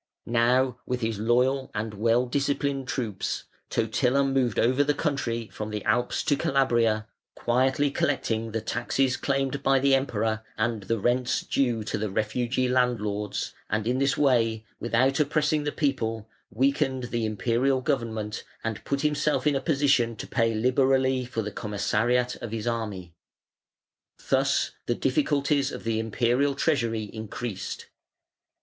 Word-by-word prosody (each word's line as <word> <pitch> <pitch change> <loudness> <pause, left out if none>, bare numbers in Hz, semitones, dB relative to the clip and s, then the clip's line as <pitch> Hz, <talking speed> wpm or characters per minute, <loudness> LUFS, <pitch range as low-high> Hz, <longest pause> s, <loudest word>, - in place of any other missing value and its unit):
Now 125 +2 +2
with 125 0 -2
his 110 -2 -1
loyal 125 +4 +2
and 105 +1 -3
well 115 +4 +2
disciplined 140 0 -1
troops, 115 -8 -3 0.3
Totila 125 +5 +1
moved 135 -4 +1
over 130 +4 +3
the 145 0 +1
country 120 -7 -1
from 105 0 -6
the 105 -1 -4
Alps 120 +3 +1
to 145 - +2
Calabria, 120 -6 +2 0.3
quietly 130 +4 +1
collecting 115 -6 -1
the 115 0 -2
taxes 125 +3 0
claimed 135 0 -1
by 135 0 +3
the 135 +1 +3
Emperor 110 -5 0 0.2
and 110 -1 0
the 115 +4 -1
rents 125 +4 +1
due 120 -5 0
to 105 - -3
the 105 0 -2
refugee 120 +5 0
landlords, 110 -5 0 0.2
and 110 0 -1
in 125 +3 +1
this 140 0 +2
way, 115 -5 +2
without 130 +5 +2
oppressing 150 0 +1
the 145 - 0
people, 115 -8 -1 0.2
weakened 130 0 0
the 120 -1 -1
Imperial 120 +5 +1
government 115 -6 -2 0.2
and 110 -2 -3
put 140 0 -1
himself 150 0 +1
in 150 -2 +3
a 135 - 0
position 135 -5 +2
to - - -6
pay 115 -2 +1
liberally 130 +2 +2
for 115 -2 -3
the 105 - -4
commissariat 115 +5 0
of 120 -3 -7
his 110 -2 -4
army. 105 -7 -3 1.2
Thus - - +2 0.2
the 120 - +1
difficulties 140 +1 +1
of - - -7
the 115 -1 0
Imperial 120 +5 +1
treasury 115 -8 0
increased. 110 -1 -6
120 Hz, 145 wpm, -26 LUFS, 110-135 Hz, 1.2 s, over